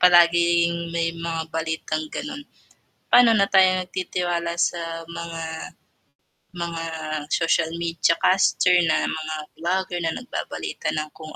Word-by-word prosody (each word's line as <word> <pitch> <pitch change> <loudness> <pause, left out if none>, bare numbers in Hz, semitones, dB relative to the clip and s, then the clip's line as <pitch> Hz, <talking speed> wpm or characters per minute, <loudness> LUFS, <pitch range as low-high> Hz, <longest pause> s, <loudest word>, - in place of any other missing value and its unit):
palaging 170 -1 +4
may 165 0 +1
mga 165 -1 -3
balitang 160 -1 -2
ganun, 285 0 -5 0.7
pano 240 -2 +7
na 200 -2 +4
tayo 185 -1 +5
nagtitiwala 175 -2 -2
sa 165 -1 -1
mga, 170 0 -6 1.1
mga 170 -1 -4 0.5
social 165 -1 +2
media 170 0 +1
caster 180 -1 +4
na - - +2
mga 155 0 -3 0.2
vlogger 180 +1 -1
na 165 - -1
nagbabalita 250 0 -5
ng 155 0 -3
kung 155 -1 -10
170 Hz, 115 wpm, -23 LUFS, 165-180 Hz, 1.1 s, pano